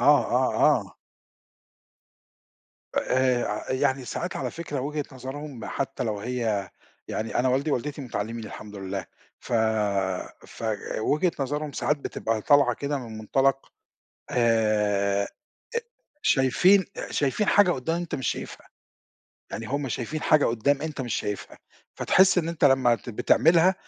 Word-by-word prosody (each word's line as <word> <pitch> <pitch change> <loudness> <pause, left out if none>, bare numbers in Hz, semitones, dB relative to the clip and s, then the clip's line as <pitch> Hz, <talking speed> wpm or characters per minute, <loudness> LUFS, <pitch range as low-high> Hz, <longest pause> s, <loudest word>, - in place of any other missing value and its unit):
آه، - - +6
آه، - - +1
آه. - - +3 2.0
آآ 130 -1 +2
ع 105 +4 -3
يعني 130 0 +1
ساعات 175 +7 -4
على - - -2
فكرة 155 -5 -5
وُجهة 150 +2 -3
نَظَرهُم، 135 +2 -7
ما - - -6
حتى 135 - -3
لو 105 -2 -2
هي 110 -6 -2 0.4
يعني 110 +2 -2
أنا 130 +1 +3
والدي 135 +4 +1
ووالدتي 145 +3 -2
متَعَلّمين 115 -3 -4
الحمد 105 0 -9
لله، 95 -1 -4 0.3
ف - - -9 0.9
فوجهة 115 - -1
نَظَرهُم 145 +2 -2
ساعات 150 - 0
بتبقى 115 -5 -2
طالعة 145 -1 +5
كده 145 0 -2
من 115 -3 -8
مُنطَلَق 135 +5 +1 0.6
آآ 105 -4 +2
إ - - -4 1.0
شايفين 180 +9 +4 0.3
شايفين 145 +9 0
حاجة 200 -3 +5
قُدّام 165 +2 -1
أنت 175 -1 -4
مش 130 - -2
شايفها. - - -5 0.8
يعني 110 - -5
هُم 140 +1 -2
شايفين 125 +7 -3
حاجة 155 -2 +4
قُدّام 135 +6 +1
أنت 155 -3 -4
مش 120 -4 -2
شايفها، 105 -1 -4 0.4
فَتَحسّ 190 -1 +4
إن 165 -1 0
أنت 170 -3 -1
لمّا 130 -3 +5
ت 120 - -10
بتعمَلها 165 - +4
130 Hz, 135 wpm, -26 LUFS, 115-150 Hz, 2.0 s, آه